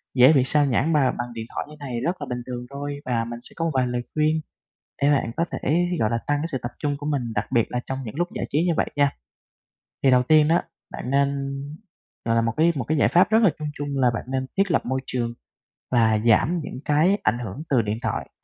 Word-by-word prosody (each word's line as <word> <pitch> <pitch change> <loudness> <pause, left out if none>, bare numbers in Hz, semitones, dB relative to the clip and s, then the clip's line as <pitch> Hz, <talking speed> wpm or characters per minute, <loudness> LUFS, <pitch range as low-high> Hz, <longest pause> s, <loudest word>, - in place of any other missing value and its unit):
dễ 130 +4 +7
bị 135 -4 +4
xao 145 +2 +3
nhãng 140 +5 +1
bà 135 -4 +3
bằng 120 0 -5
điện 115 -1 -5
thoại - - -2
như 150 - -11
thế 145 - -7
này 120 -3 -3
rất 170 +8 -1
là - - -2
bình 125 0 -3
thường 125 -1 -5
thôi, 145 +1 -5
và 115 -2 0
mình 120 0 -6
sẽ - - -13
có 165 - -1
một 165 - 0
vài 130 -2 +2
lời 120 0 -2
khuyên 155 +1 +2 0.6
để 140 - +4
bạn 135 -5 +1
có 170 - +2
thể, 170 +5 +1
gọi 110 - +2
là, 115 - 0
tăng 145 0 +2
cái 160 - -2
sự 135 - -1
tập 120 - -3
trung 145 -1 -1
của 145 - -8
mình, 145 -3 0
đặc 105 - 0
biệt 120 -3 +4
là 125 - -2
trong 135 - -3
những 110 - -7
lúc 175 +3 0
giải - - -2
trí 150 +3 +1
như 170 - +3
vậy - - +2
nha. 145 -1 +3 0.9
Thì 135 - +5
đầu 125 0 +5
tiên 155 +3 +5
đó 165 +2 +3 0.3
bạn 125 - -5
nên, 140 0 0 0.7
gọi 115 0 +2
là, 115 - +4
một 115 0 0
cái 165 +2 +4
một 135 - -1
cái 155 +7 -1
giải - - +4
pháp 180 +2 +4
rất 220 +1 +4
là 200 - +7
chung 150 - -3
chung 145 -1 -5
là 130 -2 +3
bạn - - -4
nên 130 0 -1
thiết 195 -1 +2
lập - - +1
môi 130 +1 -1
trường 120 -2 -1 0.6
và 110 -3 +3
giảm 140 +10 +4
những - - -7
cái 160 +7 +3
ảnh 110 +2 +1
hưởng 115 -3 -6
từ 130 -5 +4
điện 105 0 -2
thoại. - - -3
140 Hz, 265 wpm, -24 LUFS, 120-150 Hz, 0.9 s, dễ